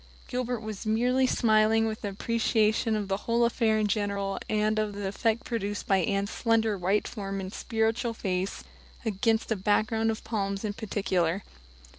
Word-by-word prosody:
Gilbert 250 -2 -2
was 215 -3 -6
merely 245 +4 +2
smiling 220 -1 +3
with 220 -1 -4
appreciation 220 +2 +1
of 210 -2 -2
the 195 0 0
whole 235 +3 +1
affair 230 -2 +2
in 215 - +2
general 200 -1 -1
and 215 0 +1
of 215 -1 -1
the 200 -1 -4
effect 225 +4 0
produced 205 -3 -3
by 195 - +3
Anne's 200 0 0
slender 225 -2 +2
white 195 +3 +1
form 195 -3 -4
and 190 +1 -6
spiritual 230 +1 -1
face 190 -2 -2 0.4
against 220 +2 +1
a - - +3
background 215 +3 +1
of 220 - -3
palms 200 -2 -2
in 205 - -2
particular. 195 -4 -1
215 Hz, 160 wpm, -28 LUFS, 200-225 Hz, 0.4 s, smiling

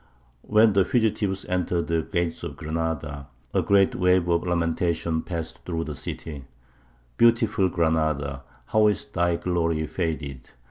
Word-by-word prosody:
When 110 - +4
the 100 -1 +4
fugitives 105 -4 0
entered 90 -1 0
the 80 0 0
gates 85 -2 -2
of - - -6
Granada 80 -3 -3 0.3
a - - +3
great 100 -1 +3
wave 90 -1 +3
of 85 +1 +1
lamentation 85 -1 0
passed 85 -2 -6
through 80 -2 -2
the 75 -2 -6
city: 70 0 -6 0.7
"Beautiful 115 -4 +4
Granada, 80 -5 0 0.2
how 110 +9 +3
is 105 -3 0
thy 85 0 0
glory 85 -3 0
faded! 75 -7 -4
85 Hz, 135 wpm, -25 LUFS, 80-95 Hz, 0.7 s, When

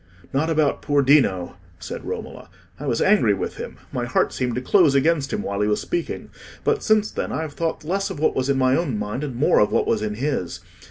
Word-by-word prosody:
"Not 150 +4 +1
about 155 -3 +1
poor 145 -1 +2
Dino," 110 -12 +3 0.2
said - - -7
Romola. - - -7 0.3
"I 145 - -5
was 120 -3 +1
angry 190 - +4
with 95 - -4
him; - - -7
my - - -2
heart - - +1
seemed 125 -2 -2
to 125 - -2
close 155 0 +4
against 145 0 +2
him - - -2
while 100 +1 -2
he 105 - +2
was 105 - +1
speaking; 345 0 -4 0.3
but 445 -1 +1
since 215 -1 +2
then - - -3
I 160 - -2
have 155 -2 -6
thought 165 0 -2
less 195 +5 -1
of - - -6
what 155 - +2
was 130 +1 0
in 140 - +2
my 130 0 +3
own 145 -10 -1
mind 105 +6 -3
and 135 -5 -4
more 135 +6 +3
of 105 - +3
what - - +2
was 110 - +1
in 105 -1 -2
his. 130 - -2
140 Hz, 235 wpm, -22 LUFS, 115-160 Hz, 0.3 s, angry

